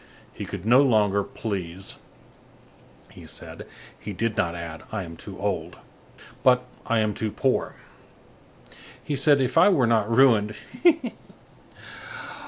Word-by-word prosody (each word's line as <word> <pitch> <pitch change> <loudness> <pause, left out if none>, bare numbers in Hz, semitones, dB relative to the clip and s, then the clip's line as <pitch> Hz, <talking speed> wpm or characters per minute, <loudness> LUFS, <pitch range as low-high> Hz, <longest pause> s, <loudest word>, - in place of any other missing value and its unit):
He - - -6
could 90 - -7
no 125 +4 +6
longer 105 -6 +3
please, 95 -4 -5 1.1
he - - -13
said; - - -8 0.3
he 105 - -6
did 115 +3 -1
not 85 -1 0
add: 85 -2 -7
"I 110 -3 -3
am 85 -1 -9
too 95 +3 -9
old," 90 -4 -3 0.6
but: 125 -1 +4 0.2
"I 115 - +2
am 110 -1 +1
too 110 - -2
poor." 130 +5 -1 1.3
He 150 - -2
said: 140 +1 +5
"If 130 -2 +2
I - - +7
were 150 -11 +3
not 115 -2 +2
ruined—Héée!" 135 - +2
110 Hz, 130 wpm, -25 LUFS, 95-130 Hz, 1.3 s, I